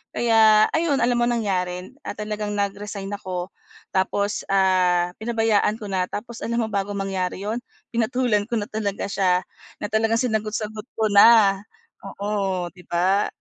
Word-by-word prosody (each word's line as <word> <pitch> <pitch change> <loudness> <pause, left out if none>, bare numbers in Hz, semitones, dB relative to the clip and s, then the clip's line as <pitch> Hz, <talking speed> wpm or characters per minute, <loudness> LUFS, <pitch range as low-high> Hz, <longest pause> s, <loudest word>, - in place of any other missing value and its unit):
Kaya 220 -2 +5
ayun 320 -2 +1
alam 245 0 +2
mo 240 - +3
nangyari? 185 -5 -2 0.2
Ah, - - -4
talagang 210 0 -4
nag-resign 200 0 -3
ako 185 -2 -5 0.4
tapos, 200 +2 0
ah, 185 -2 +3
pinabayaan 225 -2 +1
ko 210 - -7
na 185 -1 0
tapos 235 +2 -6
alam 235 - -2
mo - - -2
bago 200 0 -2
mangyari 195 -1 -3
'yon? 220 +4 -2 0.3
Pinatulan 230 -2 +1
ko 235 - -1
na 205 - -4
talaga 205 -2 -2
siya, 185 -2 +2 0.4
na 205 - 0
talagang 225 +2 +2
sinagot-sagot 215 -2 -2
ko 220 -1 +1
na. 200 -1 +7 0.6
Oo, 195 -3 -2
'di 180 -1 -16
ba? 185 +4 +2
205 Hz, 150 wpm, -23 LUFS, 190-220 Hz, 0.6 s, na